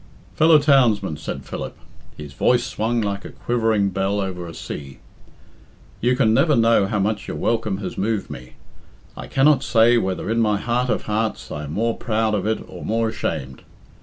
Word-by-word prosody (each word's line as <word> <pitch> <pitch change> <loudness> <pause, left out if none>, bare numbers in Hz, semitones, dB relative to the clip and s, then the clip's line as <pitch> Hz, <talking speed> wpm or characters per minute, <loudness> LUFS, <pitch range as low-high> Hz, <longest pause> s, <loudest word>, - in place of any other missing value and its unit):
"Fellow 160 0 +6
townsmen," 120 - +3
said 80 - -6
Philip - - -6 0.4
his 75 -2 -9
voice 120 - +2
swung 115 +1 -1
like 100 -1 -3
a - - -8
quivering 110 -4 0
bell 95 +2 -1
over 90 -3 -4
a 85 - -8
sea, 70 -2 -7 1.0
"you 125 +2 +2
can 115 -4 +3
never 150 +6 +3
know 115 -4 +4
how 105 - -1
much 105 +1 -1
your - - -4
welcome 110 -4 0
has 100 - -6
moved 105 +1 -1
me. 60 0 -10 0.6
I - - -8
cannot 140 +1 +3
say 115 +1 +4
whether 95 -3 -3
in 115 - +1
my 105 -2 +2
heart 125 +4 -1
of - - 0
hearts 110 +1 -2
I 75 0 -5
am 75 - -7
more 115 +4 0
proud 110 -2 -1
of 105 0 -1
it 110 - -1
or - - -10
more 115 +1 0
ashamed. 70 -11 -4
110 Hz, 185 wpm, -22 LUFS, 95-115 Hz, 1.0 s, Fellow